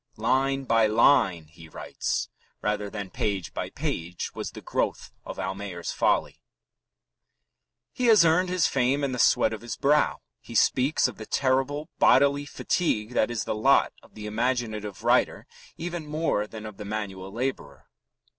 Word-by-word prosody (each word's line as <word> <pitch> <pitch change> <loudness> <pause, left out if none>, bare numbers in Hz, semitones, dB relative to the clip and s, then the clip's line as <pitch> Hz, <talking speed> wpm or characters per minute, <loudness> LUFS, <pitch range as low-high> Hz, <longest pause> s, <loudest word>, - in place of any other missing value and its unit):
"Line 135 +4 +1
by 115 -3 +3
line," 110 - +3
he 80 +1 -15
writes, - - -3 0.4
"rather 105 -1 -1
than 100 -2 -6
page 100 -4 -2
by - - -4
page, 85 +1 -4
was - - -5
the - - -10
growth - - -2
of - - -8
Almayer's 95 -1 -4
Folly." - - 0 1.5
He 250 - 0
has 215 -6 +7
earned 180 +3 +3
his 180 -2 +2
fame 135 +2 +1
in 140 - 0
the 125 - -4
sweat - - +4
of 110 - -6
his 120 -1 -5
brow. 150 +2 +2 0.2
He - - -11
speaks 130 +3 +3
of 125 - -8
the 110 - -9
terrible 135 +3 0
bodily 140 0 +4
fatigue 125 -9 -1
that 110 - +2
is 120 -2 -2
the - - -2
lot 120 +6 +3
of - - -21
the 105 -1 -8
imaginative 110 -3 -2
writer - - +2 0.3
even 170 -2 -5
more 150 -9 -1
than 110 0 -9
of 110 -2 -9
the 105 - -7
manual 100 -2 -5
labourer. 130 +5 -4
115 Hz, 160 wpm, -26 LUFS, 105-140 Hz, 1.5 s, has